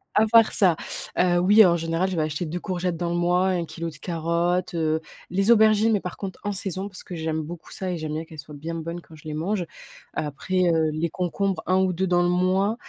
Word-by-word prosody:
À 215 - +5
part 230 -1 +6
ça, 185 -5 +4 0.4
heu, 175 -1 +3
oui, 205 +4 +7
en 170 -1 +4
général, 165 +3 -1
je 180 - -3
vais - - +2
acheter 155 +3 -2
2 170 +3 -4
courgettes 180 -2 -2
dans 175 0 -2
le - - -1
mois, 180 +2 +2
1 180 -2 0
kilo 165 +1 -5
de 155 - -12
carottes, 170 +3 -1
heu. 160 -1 +1 0.3
Les 195 +5 +2
aubergines, 220 0 +5
mais 205 - +1
par 180 - -6
contre, 195 -2 -6
en 205 - -1
saison, 195 0 -3
parce 185 - -10
que 180 - -7
j'aime 160 -1 -2
beaucoup 165 +1 -9
ça 185 -1 -4
et 175 - -3
j'aime 155 -1 -4
bien 155 +2 -3
qu'elles 160 - -13
soient 145 +1 -10
bien 160 +3 -6
bonnes 165 +1 -5
quand 165 -2 -15
je 155 - -16
les 155 - -5
mange. 180 +4 -1 0.5
Après, 175 +5 0
heu, 160 -1 +2
les 160 +2 -1
concombres, 185 +3 -2
1 185 - +2
ou 190 -1 +2
2 190 +2 -1
dans 175 0 +3
le 175 - +2
mois, 185 +4 +2
175 Hz, 245 wpm, -24 LUFS, 165-190 Hz, 0.5 s, oui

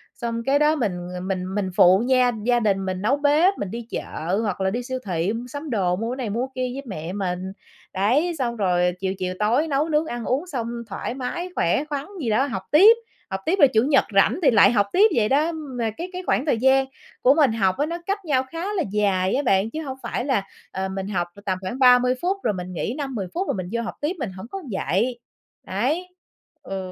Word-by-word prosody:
Xong 230 -1 -3
kế 275 +1 +3
đó 300 +1 +4
mình, 235 -9 0 0.2
ờ, 180 - -5
mình 185 0 -3
mình 200 -2 -1
phụ 185 +1 +6
nha 255 -1 +4
gia 240 0 +3
đình 195 -4 +1
mình 185 -1 -3
nấu 255 +8 +2
bếp, 300 +7 +3
mình 190 - -4
đi 235 0 -6
chợ 180 +6 -3
hoặc 205 -4 -2
là 190 - +2
đi 240 +5 -3
siêu 260 +1 -4
thị 180 +1 -1
mua 235 +2 -5
sắm 285 +4 -7
đồ, 190 -7 +1
mua 225 +5 -3
cái - - -3
này 250 -5 -3
mua 235 +5 -1
cái - - -26
kia 255 -1 -2
với 275 +1 -6
mẹ 170 -4 -5
mình. 185 -1 -3 0.4
Đấy, 260 - +1
xong 240 -2 -1
rồi 180 -4 +1
chiều 190 0 -1
chiều 185 -1 -2
tối 240 +9 +2
nấu 295 +2 0
nướng 305 +1 +2
ăn 240 -6 -5
uống 280 +8 -1
xong 245 -9 -3 0.2
thoải 195 +4 -4
mái, 270 +8 -4
khỏe 175 +11 +1
khoắn 290 -2 -4 0.2
gì 240 - -1
đó 220 +6 +3
học 195 -7 -4
tiếp, 400 +10 +8 0.3
học 190 -1 -3
tiếp 355 - +2
rồi 280 - +8
Chủ 220 -4 +2
nhật 275 +1 +4
rảnh 195 - +4
thì 285 - +6
lại 205 -2 +6
học 205 -4 +2
tiếp 415 +3 +6
vậy 215 -3 +2
đó. 300 +5 +2
Mà 265 -8 -4
cái 350 +2 -5
cái 365 +1 -5
khoảng 270 - +1
thời 285 -7 +2
gian 265 +3 +4 0.4
của 260 - +6
mình 290 -5 +4
học 190 -4 +1
á 290 - +1
nó 335 +2 -4
cách 395 -1 -2
nhau 265 -5 +2
khá 350 +5 -3
là 385 - 0
dài 195 -3 +1
á 275 - +1
bạn, 195 -1 +2
chứ 310 +7 -5
hổng 265 -4 -6
phải 245 - -3
là, 260 -8 +1 0.3
ờ, 190 0 -3
mình 190 0 -4
học 175 -4 -1
là 200 - -13
tầm 185 -1 0
khoảng 195 +7 -5
30 250 -1 +6
phút, 375 +3 0
rồi 215 - +1
mình 180 -1 -6
nghỉ 215 +7 -3
5-10 260 -10 -3
phút, 370 +3 -2
rồi - - 0
mình 185 -2 -5
vô 235 0 -1
học 230 - -5
tiếp 305 +6 -1
mình 235 -8 -3
hổng 190 +3 -9
có 390 - -5
vậy, 220 +6 -1 0.5
đấy, 285 - -1 0.6
ừ. 190 -1 -5
235 Hz, 245 wpm, -23 LUFS, 195-285 Hz, 0.6 s, tiếp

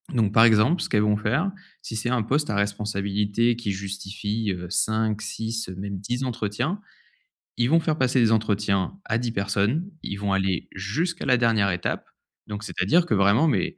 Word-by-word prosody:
Donc 110 -5 +1
par 110 - +7
exemple, 115 +10 +4
ce - - -2
qu'elles 105 - +3
vont 105 0 +2
faire, 130 - 0 0.3
si 110 - -7
c'est 110 +2 -1
un 125 -3 +1
poste 145 +6 0
à 105 - 0
responsabilité 105 +2 0
qui 115 -3 -3
justifie, 100 +2 -3
heu, 90 -1 -5
5-6, 110 +2 -1
heu, 95 - -7
même 100 +1 -5
10 120 +6 -3
entretiens, 120 - -2 0.8
ils 120 +1 +2
vont 165 +3 +5
faire 155 -2 -1
passer 130 -1 +2
des 115 -2 +4
entretiens 105 - 0
à 115 - 0
10 120 0 -2
personnes, 105 - 0
ils 100 - -4
vont 100 -1 -1
aller 95 -3 0
jusqu'à 150 - -2
la 125 -2 +4
dernière 110 -4 +2
étape. 90 0 -3 0.4
Donc 105 0 -6
c'est-à-dire 170 +10 +2
que 175 - +1
vraiment 100 +10 +4
mais, 180 +3 0
110 Hz, 185 wpm, -25 LUFS, 100-125 Hz, 0.8 s, par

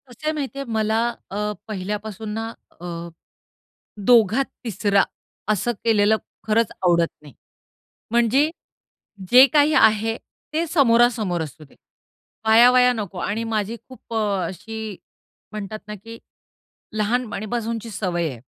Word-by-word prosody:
कसं 245 +4 -13
आहे - - +3
माहिती 275 -2 -4
आहे, 275 - -4
मला 220 0 +1 0.3
अ, 210 +1 -2 0.2
पहिल्यापासून 210 +1 -5
ना 225 +1 -3 0.3
अ, - - -7 1.2
दोघात 235 +1 +5 0.2
तिसरा 200 -2 +2 0.5
असं 215 +4 0
केलेलं 220 -1 +4 0.3
खरंच 220 0 +2
आवडत 170 -2 +4 0.2
नाही. 145 -2 -13 0.8
म्हणजे 240 +6 +3 0.8
जे 255 +2 +9
काही 300 0 +4
आहे 220 -2 +4 0.4
ते 325 +2 0
समोरासमोर 235 - +3
असू 155 0 -9
दे. 140 - -21 0.8
आया-वाया 250 +2 +7
नको 205 -6 -5
आणि 215 +5 -2
माझी 220 0 -2
खूप 255 -2 -14
अ, 200 -5 0
अशी 220 +3 -6 0.6
म्हणतात 215 0 -5
ना 210 - -5
की 230 0 -9 0.8
लहानपणीपासूनची 230 0 -2
सवय 175 -5 -1
आहे. 120 -4 -9
220 Hz, 120 wpm, -22 LUFS, 205-240 Hz, 1.2 s, जे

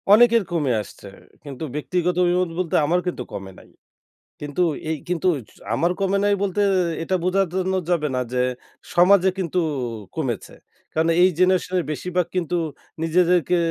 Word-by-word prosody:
অনেকের 230 +1 +6
কমে 150 -6 0
আসছে। 105 - -12 0.4
কিন্তু 140 0 -8
ব্যক্তিগত 175 +3 -1
অভিমত 180 0 +2
বলতে 180 -3 -1
আমার 175 +4 +2
কিন্তু 170 -8 -3
কমে 95 -1 -6
নাই। - - -18 0.7
কিন্তু 145 +4 -2 0.3
এই 160 - 0
কিন্তু 180 +1 0 0.2
জ - - -20 0.2
আমার 170 +8 +1
কমে 195 0 +1
নাই 205 0 +3
বলতে 200 0 0 0.4
এ - - -2
এটা 185 +3 0
বোঝার 190 +2 +2
জন্য 190 0 0 0.2
যাবে 160 -4 +1
না - - +1
যে, 125 0 +1 0.5
সমাজে 185 +2 +5
কিন্তু 180 -1 -1 0.2
অ - - -3 0.3
কমেছে। 130 -8 -3 0.4
কারণ 160 +1 +2
এই 185 - +7
জেনারেশনের 185 -1 +2
বেশিরভাগ 180 +3 -1
কিন্তু 175 -1 0 0.5
নিজেদেরকে 175 +1 +3
180 Hz, 160 wpm, -22 LUFS, 160-185 Hz, 0.7 s, এই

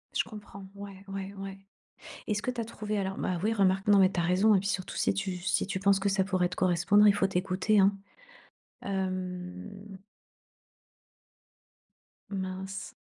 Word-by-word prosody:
Je - - +3
comprends. 205 -2 -10
Ouais, 200 -1 -9
ouais, 195 0 -5
ouais. 195 0 -6 0.7
Est-ce 210 -1 0
que 250 - -1
tu 240 -2 -4
as - - -4
trouvé 215 -2 -4
alors? 190 -1 -2
Bah 180 - -1
oui, 220 - +2
remarque, 195 -1 +2
non, 205 -1 +6
mais 190 0 +5
tu 180 - -2
as - - +1
raison, 190 +5 +4
et - - +4
puis 200 +1 -3
surtout, 185 -2 -3
si - - +2
tu 195 -1 -2
si 185 +1 0
tu 190 -1 -2
penses 195 0 +3
que 200 +1 +1
ça 195 0 +2
pourrait 185 -2 +1
te 180 - -6
correspondre, 185 +4 +4
il 205 - +7
faut 195 -1 +2
t'écouter, 190 +3 +1
hein, 195 +1 +5 0.9
hem. 185 +1 -5 2.3
Mince, 190 0 -5
195 Hz, 175 wpm, -29 LUFS, 185-200 Hz, 2.3 s, il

